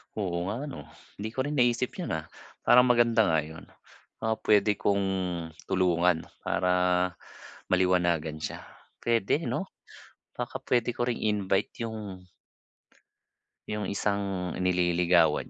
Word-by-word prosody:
Oo 90 -4 -2
nga 115 +7 -3
'no, 145 -2 -7 0.3
hindi 105 +2 -3
ko 130 - 0
rin 145 -1 -2
naisip 120 0 +2
yun, 175 - -2
ah, 80 - -4 0.4
parang 125 +1 +6
maganda 120 -3 +4
nga 80 -2 +3
yun. 80 +2 -11 0.5
Ah, 110 0 0
pwede 105 0 +4
kong 100 0 +1 0.7
tulungan 90 -2 +2 0.2
para 90 +2 0 1.0
maliwanagan 85 -4 +1
siya, - - -4 0.5
pwede 115 +7 +1
no? 195 - -2 0.7
Baka - - -3
pwede 120 -1 +2
ko 120 - +1
ring 120 - -2
i-invite 105 +1 0
yung 105 -5 -7 1.4
Yung 105 -2 -3
isang 100 -3 -1
nililigawan 90 -3 +3
100 Hz, 120 wpm, -28 LUFS, 90-115 Hz, 1.4 s, parang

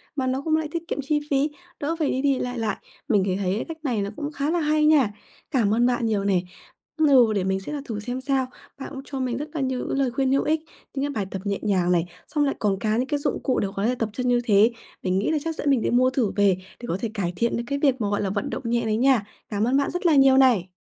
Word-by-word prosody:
mà 265 -3 -1
nó 260 +1 0
cũng 315 +2 +1
lại 315 -1 0
tiết 335 0 -4
kiệm 285 - -3
chi 295 +2 +1
phí, 280 +2 +2 0.3
đỡ 315 +3 -1
phải 300 - +1
đi 260 - -1
đi 275 -2 +2
lại 245 -1 -3
lại. 215 -3 -1 0.3
Mình 210 -8 +3
thì 185 -2 0
thấy 190 -2 -1
cái 220 - -3
cách 325 - -6
này 235 -6 0
nó 200 - -2
cũng 295 0 -4
khá 285 0 -2
là 345 - +1
hay 305 0 +2
nha, 285 -9 +4 0.4
cảm 225 -7 +2
ơn 240 +2 +3
bạn 245 -1 +1
nhiều 210 -3 0
nè 190 -3 +2 0.6
ừ 265 -8 +5
để 195 - 0
mình 190 +1 0
sẽ 245 +10 -7
là 290 - -3
thử 220 -4 -4
xem 245 +4 -4
sao. 265 -1 0 0.3
Bạn 270 - -6
cũng 270 - -6
cho 275 - -5
mình 250 -2 -1
rất 295 +1 -5
là 310 - -2
nhiều 260 -1 -1
những - - -1
lời 265 -3 +1
khuyên 265 +1 0
hữu 275 - +3
ích, 310 +1 +1 0.3
những 275 - -2
cái 290 - -2
bài 215 -8 -2
tập 190 - -4
nhẹ 200 -1 -1
nhàng 185 -4 +1
này, 175 -1 +2 0.2
xong 295 -1 +1
lại 275 - 0
còn 200 -3 0
cả 215 +1 0
những 255 - 0
cái 290 +1 -1
dụng - - -2
cụ 260 - +1
để 200 - 0
có 200 +2 -1
thể 250 +2 +1
tập 225 -3 -2
chân 250 +2 -2
như 245 -1 +3
thế. 215 +1 +5 0.3
Mình 185 0 +1
nghĩ 205 - 0
là 315 - +2
chắc 325 - -2
dẫn 295 - -1
mình 270 -4 +3
đi - - 0
mua 255 +2 +4
thử 255 -6 0
về, 200 -3 +3 0.2
để 240 - -6
có 175 - -1
thể 230 - -1
cải 180 -5 -2
thiện 235 +4 0
được 235 - -2
cái 280 0 -2
việc 270 -4 +2
mà, 205 - 0
gọi 205 - 0
là, 195 - -1
vận 205 +1 -2
động - - -5
nhẹ 235 +1 +1
đấy 215 0 +1
nha, 255 -4 +3 0.2
cảm 210 -1 -1
ơn 260 +2 +3
bạn 280 - +1
rất 355 +1 -4
là 325 -3 +5
nhiều 270 -1 +6
này. 220 -9 +4
250 Hz, 305 wpm, -24 LUFS, 210-280 Hz, 0.6 s, nhiều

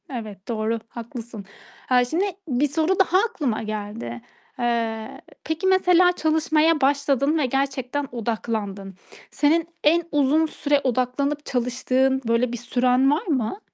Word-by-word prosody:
Evet, 215 -7 -7
doğru, 225 0 -1
haklısın. 235 -3 -8 0.4
Haa, 250 -1 +4
şimdi 330 +10 0 0.2
bir 275 +1 +1
soru 325 +6 0
daha 370 -1 +4
aklıma 345 - -1
geldi. 205 - -5 0.4
Eee, 230 -2 -2 0.2
peki 320 +4 -2
mesela 360 -1 +5
çalışmaya 315 -1 +2
başladın 280 +2 +2
ve 300 - +1
gerçekten 270 +1 -2
odaklandın. 215 -4 -4 0.4
Senin 315 +3 +2 0.2
en 335 +3 +4
uzun 295 +2 +3
süre 290 -2 0
odaklanıp 270 +4 -1
çalıştığın 260 +2 0
böyle 230 +1 +1
bir - - -3
süren 250 +3 +2
var 300 +5 -1
mı? 270 - -1
265 Hz, 125 wpm, -23 LUFS, 230-305 Hz, 0.4 s, mesela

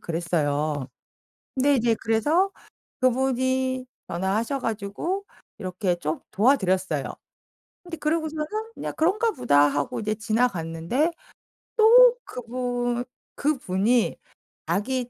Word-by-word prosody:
그랬어요. 155 -4 -1 0.7
근데 280 +2 +4
이제 230 -1 +2
그래서 295 - +2 0.5
그분이 260 0 +1 0.2
전화하셔 200 +9 -1
가지고 225 - -3 0.3
이렇게 185 -1 -1
좀 155 -2 -3
도와 255 +8 +4
드렸어요. 185 - 0 0.8
근데 345 -2 -6
그러고서는 310 0 -1 0.3
그냥 - - -5
'그런가 425 +8 +2
보다.' 145 - +4
하고 145 0 -2
지나갔는데 215 - 0 0.7
또 480 +3 +8
그분 245 0 -3 0.3
그분이 240 -5 +1 0.5
자기 250 +4 -1
240 Hz, 240 characters per minute, -25 LUFS, 185-275 Hz, 0.8 s, 또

